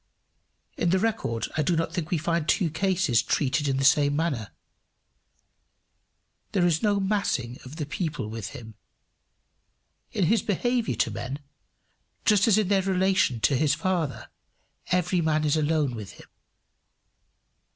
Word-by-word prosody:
In 170 - +1
the 190 - +3
record 200 - -1
I - - +3
do 170 +4 +1
not 165 0 -1
think 170 -4 -3
we 175 - +1
find 165 0 -1
two 170 -5 +2
cases 175 - +1
treated 145 +1 0
in 135 -1 0
the 135 - 0
same 145 0 +4
manner. 145 -9 -1 2.0
There 185 -3 +3
is 165 -2 +2
no 205 -2 +2
massing 190 - -1
of 130 +3 -10
the 155 -2 -3
people 155 - -3
with 110 -2 -6
him. 115 -5 -10 1.4
In 200 - 0
his 215 +5 +3
behaviour 240 +4 0
to - - 0
men, 130 +3 -5 0.9
just 210 -1 +4
as 215 -2 +5
in 215 -3 +2
their 195 -1 +3
relation 185 - +1
to 140 - +3
his 150 +2 +2
Father, 160 - -2 0.6
every 180 0 +1
man 155 -1 +1
is 150 0 +2
alone 155 -3 +1
with 105 -4 -7
him. - - -15
160 Hz, 150 wpm, -26 LUFS, 140-190 Hz, 2.0 s, as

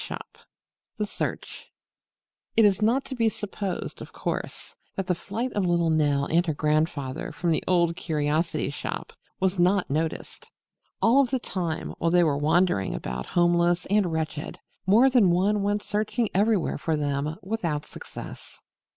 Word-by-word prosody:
III - - -3 0.8
THE 210 - 0
SEARCH - - -5 0.9
It 225 - +7
is 200 0 +3
not 240 +6 +2
to - - -6
be 230 -2 +3
supposed, 200 -3 -5
of - - -9
course, - - -5 0.2
that 195 - -2
the 180 - +1
flight 225 +8 -4
of 205 - 0
little 170 -2 +2
Nell 145 -3 +2
and 170 +4 +2
her 155 - 0
grandfather 150 -1 -1
from 175 -1 -1
the 160 - +1
Old 170 -2 +3
Curiosity 155 -2 -1
Shop 145 - -5 0.3
was 190 -1 0
not 180 -2 +3
noticed. 160 +2 -3 0.5
All 260 +5 +6
the 260 +1 -1
time, 175 -9 -3
while 165 - +2
they 175 +1 +5
were 150 -4 +2
wandering 155 - +2
about 60 0 -5
homeless 175 0 +2
and 205 -4 +3
wretched, 155 -2 -3 0.3
more 225 +7 +6
than 245 -8 +5
one 200 +4 +2
went 205 +1 0
searching 215 +2 -1
everywhere 205 -1 +2
for 160 -2 0
them 145 +1 -1
without 175 -8 -2
success. - - -10
175 Hz, 155 wpm, -26 LUFS, 155-205 Hz, 0.9 s, It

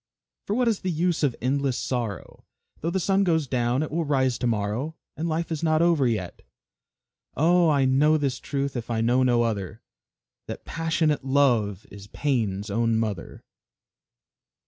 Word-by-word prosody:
"For 205 - 0
what 250 0 +2
is 220 -4 +1
the 185 - -3
use 170 0 0
of 140 -6 +1
endless 135 0 0
sorrow? 115 -8 -4 0.4
Though 165 - -2
the 190 +2 -1
sun 195 +2 +2
goes 160 -5 +1
down, 125 +1 0
it 155 - -5
will 165 +2 0
rise 130 -4 +1
to 125 - 0
morrow; 115 +8 -2 0.2
And 165 +3 -3
life 165 +1 -2
is 160 - -2
not 160 0 +2
over 165 -6 +3
yet." 95 -7 -3 1.0
Oh! 170 +2 +4
I 140 -3 +3
know 145 +4 +4
this 135 -4 -1
truth, 140 -1 -3
if 120 -1 -5
I 115 -1 -1
know 120 +3 +3
no 120 -2 +3
other, 110 -1 -3 0.6
That - - -7
passionate 160 -3 0
Love 120 -8 +1
is 100 0 -11
Pain's 105 -6 -2
own 115 +2 +1
mother. 105 -6 -4
135 Hz, 170 wpm, -25 LUFS, 115-160 Hz, 1.0 s, Oh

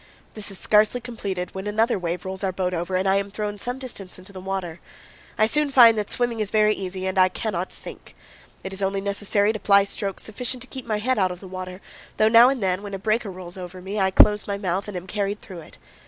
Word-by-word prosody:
This 215 -2 -4
is 195 - -4
scarcely 215 +5 +3
completed 200 -7 -5
when 190 +2 -5
another 220 +1 +1
wave 175 0 -3
rolls 190 +1 -4
our 190 - +1
boat 185 0 -2
over 175 +2 -2
and 185 +1 +1
I 190 +1 +4
am 200 0 -2
thrown 205 0 -4
some 245 +4 -3
distance 225 -8 -7
into 185 +2 -14
the 190 - -7
water. 185 -3 -4 0.6
I 215 - +5
soon 300 +5 +2
find 240 -4 +8
that 210 -2 -2
swimming 240 -2 -1
is 210 -2 -1
very 215 0 +3
easy 190 -1 -5
and 190 0 0
I 185 0 +6
cannot 185 -2 -3
sink. - - -8 0.5
It 190 - -6
is 190 - -5
only 195 0 0
necessary 205 +1 +1
to 215 - -5
ply 200 0 +5
strokes 195 -1 -4
sufficient 245 +3 -4
to - - -13
keep 260 -2 -8
my 215 -2 0
head 255 +3 0
out 185 -1 +3
of 180 -1 -7
the 190 - -11
water, 185 0 -7 0.4
though 215 - +4
now 235 +2 +8
and 265 -5 -1
then, 185 0 0
when 200 -1 -6
a - - -3
breaker 215 +2 0
rolls 185 -1 -9
over 180 0 -8
me, 195 +3 -4
I 190 -1 +3
close 210 +2 +5
my 200 -1 -2
mouth 190 0 -2
and 205 -3 -5
am 180 - -7
carried 205 +1 -2
through 185 -4 -10
it. 160 - -13
200 Hz, 250 wpm, -24 LUFS, 185-215 Hz, 0.6 s, find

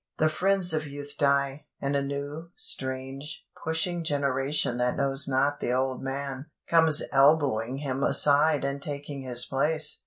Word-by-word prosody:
The 155 - +3
friends 185 +1 +1
of 155 -1 -1
youth 145 0 -8
die, 140 0 +1
and 140 +1 -1
a 140 - +2
new, 140 +4 -5
strange, 135 +3 -5 0.2
pushing 165 +2 -1
generation 140 -3 0
that 125 0 0
knows 135 0 +1
not 140 +2 +1
the 120 - -1
old 130 0 -1
man, 135 +1 -5 0.2
comes 160 -3 +6
elbowing 135 -4 +3
him 135 -2 -3
aside 145 +1 +3
and 140 0 -3
taking 145 -1 -6
his 125 -2 0
place. 150 +3 +1
140 Hz, 150 wpm, -27 LUFS, 135-150 Hz, 0.2 s, comes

